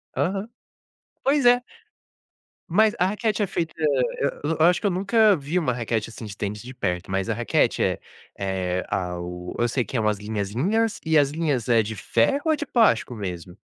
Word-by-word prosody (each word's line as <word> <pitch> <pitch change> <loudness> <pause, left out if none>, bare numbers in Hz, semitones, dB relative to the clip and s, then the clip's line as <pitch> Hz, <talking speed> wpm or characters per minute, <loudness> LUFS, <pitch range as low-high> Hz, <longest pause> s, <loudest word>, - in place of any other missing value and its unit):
Aham. 195 +3 -1 0.8
Pois 275 -1 +2
é. 245 0 +6 1.1
Mas 210 +5 +4
a 180 - +3
raquete 210 +1 0
é - - 0
feita 165 -2 -3
hã, 145 -4 +2 0.4
eu 160 +2 0
eu 160 - +6
acho 175 0 +4
que 205 - 0
eu - - +1
nunca 200 +3 +4
vi 155 +3 -1
uma 125 -7 0
raquete 115 -2 -2
assim 115 - -9
de 100 -2 -8
tênis 105 +1 -4
de 125 +2 -9
perto, 95 -5 -3
mas 95 0 -1
a - - +2
raquete - - +1
é - - 0 0.4
é 95 -2 -2
ao 90 -1 -4
eu 120 - +3
sei 125 +1 0
que 130 - -4
é - - +1
umas 105 -1 +1
linhazinhas 115 - -1
e 160 -1 +3
as 145 -2 +4
linhas 145 -6 -1
é 115 -2 +4
de 110 +1 -5
ferro 115 - +1
ou 315 - +3
é - - +2
de 295 - -4
plástico 220 - +2
mesmo? 90 -3 -6
125 Hz, 200 wpm, -24 LUFS, -, 1.1 s, é